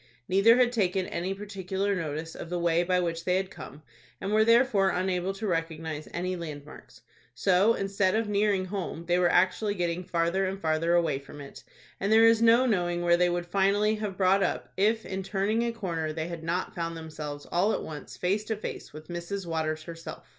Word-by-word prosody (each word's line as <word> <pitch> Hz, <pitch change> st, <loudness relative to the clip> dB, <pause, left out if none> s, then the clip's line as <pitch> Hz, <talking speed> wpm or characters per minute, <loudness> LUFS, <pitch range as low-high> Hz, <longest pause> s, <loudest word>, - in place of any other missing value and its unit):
Neither 200 Hz, +5 st, +5 dB
had 250 Hz, -1 st, +4 dB
taken 190 Hz, -5 st, 0 dB
any 185 Hz, +3 st, -3 dB
particular 195 Hz, 0 st, -3 dB
notice 160 Hz, -1 st, -4 dB
of 165 Hz, -, -8 dB
the 180 Hz, -, -2 dB
way 170 Hz, -1 st, +2 dB
by 180 Hz, +1 st, +1 dB
which 165 Hz, -2 st, -2 dB
they 180 Hz, +1 st, +1 dB
had 190 Hz, 0 st, -3 dB
come, 145 Hz, 0 st, -11 dB, 0.4 s
and 195 Hz, -, -3 dB
were 215 Hz, 0 st, +5 dB
therefore 230 Hz, -4 st, +4 dB
unable 185 Hz, 0 st, -1 dB
to 215 Hz, +3 st, -5 dB
recognize 165 Hz, -3 st, -3 dB
any 185 Hz, +2 st, -2 dB
land 155 Hz, -4 st, -7 dB
marks. 150 Hz, -, -14 dB, 0.3 s
So, 195 Hz, +4 st, +3 dB
instead 195 Hz, -1 st, 0 dB
of 225 Hz, 0 st, 0 dB
nearing 205 Hz, -2 st, +1 dB
home, 185 Hz, -3 st, -5 dB
they 175 Hz, +1 st, +2 dB
were 175 Hz, -1 st, +4 dB
actually 190 Hz, +3 st, +2 dB
getting 175 Hz, -1 st, -2 dB
farther 175 Hz, +2 st, 0 dB
and 195 Hz, +1 st, -4 dB
farther 165 Hz, 0 st, +1 dB
away 160 Hz, -5 st, +1 dB
from 145 Hz, +1 st, -12 dB
it, 140 Hz, -1 st, -11 dB, 0.4 s
and 200 Hz, -, -1 dB
there 225 Hz, +1 st, +7 dB
is 225 Hz, 0 st, +5 dB
no 230 Hz, +2 st, +5 dB
knowing 175 Hz, -6 st, 0 dB
where 170 Hz, 0 st, +5 dB
they 175 Hz, 0 st, +3 dB
would 175 Hz, 0 st, -2 dB
finally 200 Hz, +3 st, +2 dB
have 205 Hz, -3 st, -4 dB
brought 195 Hz, +1 st, +3 dB
up, -, -, -2 dB
if 220 Hz, +3 st, +1 dB
in 190 Hz, 0 st, -4 dB
turning 200 Hz, +3 st, 0 dB
a 235 Hz, 0 st, 0 dB
corner 170 Hz, -8 st, -3 dB
they 160 Hz, +1 st, -4 dB
had 170 Hz, -2 st, -7 dB
not 170 Hz, +3 st, -2 dB
found 165 Hz, -1 st, -4 dB
themselves 150 Hz, -2 st, -7 dB
all 190 Hz, +5 st, +2 dB
at -, -, -2 dB
once 150 Hz, -3 st, -8 dB
face 195 Hz, +4 st, 0 dB
to 220 Hz, -, -2 dB
face 210 Hz, -, -7 dB
with 155 Hz, +1 st, -11 dB
Mrs. 175 Hz, +3 st, -5 dB
Waters 155 Hz, -1 st, -2 dB
herself. 165 Hz, 0 st, -9 dB
180 Hz, 205 wpm, -28 LUFS, 165-200 Hz, 0.4 s, there